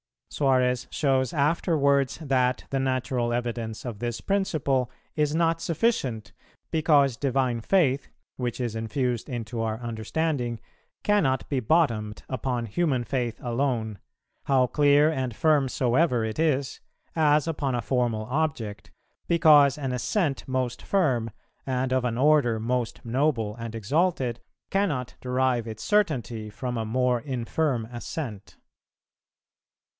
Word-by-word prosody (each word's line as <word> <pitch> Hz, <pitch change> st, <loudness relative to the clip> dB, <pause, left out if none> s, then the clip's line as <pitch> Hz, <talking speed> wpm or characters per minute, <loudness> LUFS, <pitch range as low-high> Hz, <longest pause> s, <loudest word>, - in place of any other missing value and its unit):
Suarez 125 Hz, -3 st, +1 dB
shows 135 Hz, -2 st, +1 dB
afterwards 140 Hz, -3 st, +2 dB
that 130 Hz, -4 st, +1 dB
the 135 Hz, -, 0 dB
natural 130 Hz, -2 st, 0 dB
evidence 120 Hz, -2 st, -3 dB
of 115 Hz, -5 st, -5 dB
this 120 Hz, -1 st, -3 dB
principle 150 Hz, -10 st, 0 dB, 0.3 s
is 150 Hz, 0 st, +1 dB
not 165 Hz, 0 st, +1 dB
sufficient, 145 Hz, -, -1 dB, 0.4 s
because 145 Hz, -6 st, +3 dB
divine 130 Hz, -3 st, 0 dB
Faith, 140 Hz, -, +2 dB, 0.3 s
which 125 Hz, -1 st, -3 dB
is 120 Hz, -3 st, -2 dB
infused 120 Hz, +3 st, -2 dB
into 120 Hz, -2 st, -4 dB
our 110 Hz, -1 st, -1 dB
understanding, 120 Hz, +2 st, -2 dB, 0.4 s
cannot 155 Hz, -12 st, +2 dB
be 140 Hz, -, 0 dB
bottomed 115 Hz, -6 st, +1 dB
upon 125 Hz, -2 st, -2 dB
human 130 Hz, +2 st, 0 dB
faith 120 Hz, -2 st, -2 dB
alone, 120 Hz, -4 st, -1 dB, 0.5 s
how 130 Hz, -2 st, +4 dB
clear 145 Hz, +3 st, +4 dB
and 130 Hz, -6 st, -3 dB
firm 150 Hz, -2 st, +3 dB
soever 125 Hz, 0 st, +2 dB
it 110 Hz, +6 st, -4 dB
is, 140 Hz, -4 st, 0 dB, 0.4 s
as 150 Hz, -2 st, +3 dB
upon 145 Hz, -5 st, -1 dB
a 120 Hz, -, -1 dB
formal 120 Hz, -4 st, 0 dB
object, 130 Hz, -7 st, -2 dB, 0.4 s
because 150 Hz, -4 st, +6 dB
an 135 Hz, -3 st, -3 dB
assent 140 Hz, -, -1 dB
most 130 Hz, -1 st, -2 dB
firm, 130 Hz, -, +1 dB, 0.4 s
and 130 Hz, 0 st, 0 dB
of 130 Hz, -1 st, +1 dB
an 115 Hz, -1 st, -1 dB
order 135 Hz, -5 st, +3 dB
most 120 Hz, +1 st, -2 dB
noble 120 Hz, -4 st, 0 dB
and 115 Hz, -1 st, -6 dB
exalted, 130 Hz, -, 0 dB, 0.3 s
cannot 150 Hz, -11 st, 0 dB
derive 125 Hz, -2 st, 0 dB
its 110 Hz, -1 st, -7 dB
certainty 120 Hz, -, 0 dB
from 125 Hz, +4 st, -4 dB
a 110 Hz, -, -2 dB
more 125 Hz, +2 st, +1 dB
infirm 130 Hz, 0 st, -1 dB
assent. 120 Hz, -3 st, -6 dB
130 Hz, 125 wpm, -26 LUFS, 120-150 Hz, 0.5 s, because